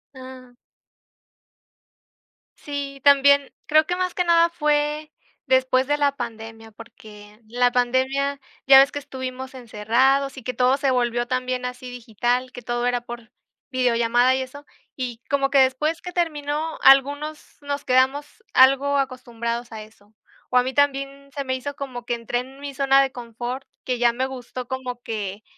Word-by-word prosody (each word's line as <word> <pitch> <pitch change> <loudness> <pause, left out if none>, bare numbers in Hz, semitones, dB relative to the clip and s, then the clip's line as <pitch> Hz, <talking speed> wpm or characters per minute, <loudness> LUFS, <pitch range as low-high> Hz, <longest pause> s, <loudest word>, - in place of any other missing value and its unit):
Ah. 255 -1 -12 2.1
Sí, 280 -1 -6
también 280 0 +5
creo 310 0 +4
que 355 - -2
más 365 -1 -2
que 360 - +1
nada 335 0 +4
fue 300 -2 -1 0.3
después 260 0 +2
de 290 +1 0
la 285 -1 +2
pandemia, 225 -2 -8
porque 210 -1 -14
la 245 +2 +1
pandemia, 265 +3 0 0.2
ya 270 0 +9
ves 275 +1 +5
que - - -6
estuvimos 260 -1 -7
encerrados 260 +4 +1
y 255 - -9
que 255 - -3
todo 255 +1 +3
se 275 -1 0
volvió 240 -1 0
también 255 0 -2
así 250 0 -6
digital, 245 +2 -2
que 245 - -10
todo 240 +1 -2
era 245 -1 0
por 240 0 -10 0.4
videollamada 245 0 +2
y 265 - -1
eso, 285 +3 -9 0.3
y 245 -3 -5
como 275 0 +1
que 275 - +5
después 295 +5 +1
que 360 - -7
terminó, 310 -2 -2
algunos 285 +3 +3
nos 285 0 -4
quedamos 270 - +1
algo 275 +2 +5
acostumbrados 240 -3 -3
a 215 -1 -7
eso. 215 -1 -21 0.4
O 250 - +2
a 250 - +5
mí 260 +1 -4
también 275 0 0
se 280 - -2
me 260 -1 -2
hizo 285 +2 -6
como 250 -4 -7
que 240 - -1
entré 235 +1 -3
en 265 +2 -10
mi 285 -1 -7
zona 275 0 +4
de 270 - -2
confort, 240 +2 -6 0.2
que 250 -2 -2
ya 240 -1 +3
me 255 +2 -1
gustó 255 -1 -7
como 255 -2 -5
que 210 -2 -5
260 Hz, 165 wpm, -23 LUFS, 245-280 Hz, 2.1 s, ya